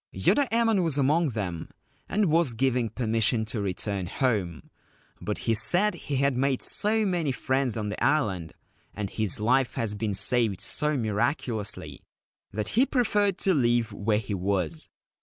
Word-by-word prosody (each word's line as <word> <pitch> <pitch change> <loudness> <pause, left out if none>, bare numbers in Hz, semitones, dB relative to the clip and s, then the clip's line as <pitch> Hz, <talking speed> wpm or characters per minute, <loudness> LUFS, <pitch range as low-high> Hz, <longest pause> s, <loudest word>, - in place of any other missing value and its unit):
Yoda 285 -3 +2
Emon 225 -3 +3
was 160 -4 -1
among 150 +4 +2
them, 95 -8 -4 0.4
and 210 +1 +2
was 160 -7 +2
given 125 -1 +1
permission 110 0 +1
to 110 0 -3
return 100 -1 -2
home; 100 - -2 0.5
but - - -3
he 115 - 0
said 180 - +2
he 145 - -5
had 140 0 +2
made 135 0 0
so 215 +1 +2
many 175 -7 0
friends 130 -2 -1
on 105 -2 -2
the 105 - -4
island, 100 - +1 0.4
and 100 -2 -4
his 110 -4 -1
life 125 +4 +2
had 105 -3 -2
been 105 -3 -1
saved 115 -3 +2
so 150 -1 0
miraculously, 115 -1 -2 0.5
that 105 +1 -3
he 240 - +3
preferred 210 -8 +1
to 195 - +1
live 120 -5 +1
where 105 +1 0
he 105 -1 -4
was. 90 -4 -2
120 Hz, 160 wpm, -27 LUFS, 105-150 Hz, 0.5 s, Emon